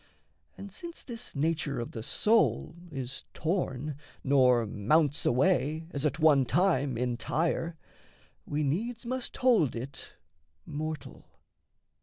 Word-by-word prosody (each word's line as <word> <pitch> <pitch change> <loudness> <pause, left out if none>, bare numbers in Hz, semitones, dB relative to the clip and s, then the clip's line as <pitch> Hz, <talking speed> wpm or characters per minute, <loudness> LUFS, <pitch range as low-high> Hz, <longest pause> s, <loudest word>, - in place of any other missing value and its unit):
And 200 0 -8
since 340 - -8
this 240 -1 -8
nature 150 -2 0
of 120 - -4
the 110 - -6
soul 215 - +2 0.2
is 135 -3 -6
torn, 150 -5 -1 0.3
Nor 125 -4 +4
mounts 145 +9 +2
away, 155 +4 +2
as 140 +1 0
at 145 - -3
one 155 -4 +5
time, 140 -2 +2
entire, 155 +8 -1 0.7
We 150 +1 -1
needs 225 - -2
must 255 +1 -3
hold 235 - +3
it 130 +4 -7 0.5
mortal. 155 +1 -6
150 Hz, 115 wpm, -30 LUFS, 130-175 Hz, 0.7 s, one